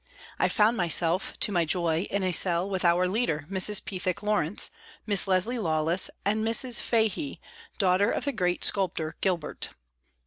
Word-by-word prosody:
I - - +2
found 220 +2 +2
myself, 175 0 +1
to - - +2
my 175 -3 +1
joy, 165 +1 -1
in 200 -1 -2
a 185 - 0
cell 175 +1 +3
with 190 -2 -3
our 175 +1 +3
leader, 180 -7 -1
Mrs. 195 +1 +2
Pethick 185 0 -4
Lawrence, 205 -4 0 0.3
Miss 205 -2 +2
Leslie 195 +6 +1
Lawless 160 -1 +1 0.2
and 215 +2 0
Mrs. 230 +2 +3
Fahey, 230 +6 -1 0.4
daughter 195 +1 +2
of - - -2
the 285 - 0
great 180 -7 -1
sculptor 165 -5 -1
Gilbert. 180 -5 -2
185 Hz, 160 wpm, -26 LUFS, 175-210 Hz, 0.4 s, cell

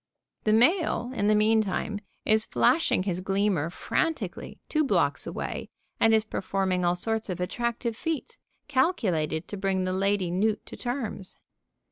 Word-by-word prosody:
The 215 - +3
male, 255 - +3
in 205 -5 0
the 215 - +5
meantime, 215 -1 +1 0.3
is 215 0 +3
flashing 155 - +3
his 185 -2 -2
gleamer 195 -4 +1
frantically 240 - -2
two 310 0 +1
blocks 275 - +1
away - - -4 0.3
and 225 - +5
is 220 0 +3
performing 190 -3 -1
all 175 0 +2
sorts 220 +4 -2
of 180 - -3
attractive 235 +5 -2
feats, 325 - -4 0.3
calculated 195 - +1
to 205 - -6
bring 190 -1 0
the 185 0 -1
lady 195 -1 +1
newt 210 +4 0
to - - -9
terms. 240 -6 -4
210 Hz, 145 wpm, -27 LUFS, 185-235 Hz, 0.3 s, the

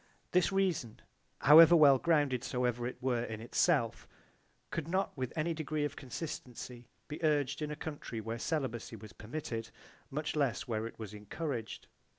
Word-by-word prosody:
This 180 +1 +3
reason 180 - 0 0.4
however 160 +4 +9
well 140 -5 +7
grounded 145 -7 +2
soever 125 -1 -1
it 125 - -6
were 125 -2 0
in 110 -2 -5
itself 115 - +1 0.6
could 160 -2 -3
not 190 +3 -1
with 130 -3 -3
any 165 +1 0
degree 155 -1 -2
of 145 +1 -4
consistency 125 -4 -7 0.2
be 150 +2 -7
urged 145 -3 +1
in 150 - -2
a 150 - -4
country 145 -6 -6
where 115 +2 -4
celibacy 130 -6 -2
was 110 0 -11
permitted, 115 -1 -5 0.4
much 150 +3 -3
less 140 -5 0
where 110 -1 -2
it - - -12
was 105 -2 -7
encouraged. 115 +3 -5
135 Hz, 160 wpm, -33 LUFS, 115-155 Hz, 0.6 s, however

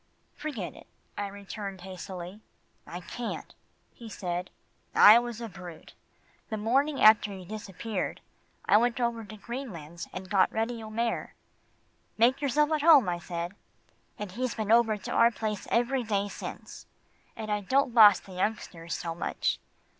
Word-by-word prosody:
"Forget 280 - -5
it," - - -15 0.3
I 205 - -3
returned 200 -1 -7
hastily. 185 +1 -8 0.5
"I 175 - -7
can't," 235 +6 -6 0.4
he 230 -2 -11
said. 180 -3 -4 0.5
"I 215 +3 +9
was 240 -2 -5
a 235 - -5
brute. 180 -5 -11 0.6
The 220 - -2
morning 270 +7 +1
after 215 -1 +6
you 190 -2 -8
disappeared, 210 0 -4 0.5
I - - +6
went 240 +2 +1
over 235 -2 -1
to 215 0 -10
Greenlands 190 - -7
and 185 0 -7
got 190 -1 +3
Reddy 225 +1 -2
O'Mare. 225 +2 -3 0.8
'Make 245 +5 +4
yourself 295 +2 +2
at 310 -1 +1
home,' 295 - +7
I 175 0 -2
said, 170 0 -4 0.7
and 205 -3 -6
he's 250 +5 -3
been 220 -1 -2
over 225 -2 +4
to 195 - -7
our 230 - +5
place 215 -3 -4
every 245 +3 +1
day 205 -3 -1
since, - - -8 0.5
and 215 -1 -5
I 210 0 0
don't 260 +4 +1
boss 210 -5 +8
the 190 - -13
youngsters 180 -3 -3
so 165 -1 -4
much. 170 - -1
215 Hz, 155 wpm, -28 LUFS, 190-235 Hz, 0.8 s, I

